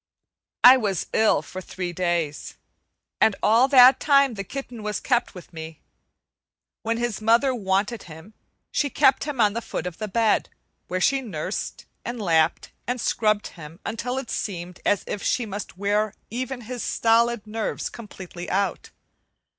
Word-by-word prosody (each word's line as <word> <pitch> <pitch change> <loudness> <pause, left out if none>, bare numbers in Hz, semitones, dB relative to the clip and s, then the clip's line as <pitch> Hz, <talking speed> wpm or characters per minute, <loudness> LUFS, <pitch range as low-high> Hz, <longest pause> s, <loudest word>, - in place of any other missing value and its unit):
I 255 +2 +10
was 200 -8 -1
ill 220 - +3
for 185 - -8
three 180 -1 -5
days, 170 -4 -2 0.7
and 220 - +5
all 230 +5 +5
that 260 -1 +7
time 275 -3 +4
the 200 -2 -5
kitten 245 +1 -7
was 210 0 -3
kept 245 -5 0
with 180 -1 -12
me. 160 -1 -8 1.0
When 230 +1 -1
his 235 -3 -2
mother 235 +5 +3
wanted 200 0 -1
him, 160 +7 -12 0.4
she 285 - 0
kept 265 +2 +3
him 295 -4 -5
on 210 -2 +4
the 235 - -3
foot 180 - -5
of 180 -2 -6
the 215 - -3
bed, 220 +1 +1 0.4
where 185 +1 -2
she 275 +7 +3
nursed, 185 -5 -5 0.2
and 240 0 -5
lapped, 165 -4 +1 0.2
and 245 +1 -1
scrubbed 215 -2 +1
him 165 +1 -12
until 245 +3 -3
it 265 - -5
seemed 180 -3 -4
as 205 - +2
if 205 - -4
she 245 - 0
must 205 -2 -7
wear 205 +2 0 0.2
even 250 +2 -4
his 245 +1 -6
stolid 230 -1 +2
nerves 220 +1 -3
completely 185 -5 -9
out. 195 -1 -1
215 Hz, 160 wpm, -24 LUFS, 185-240 Hz, 1.0 s, I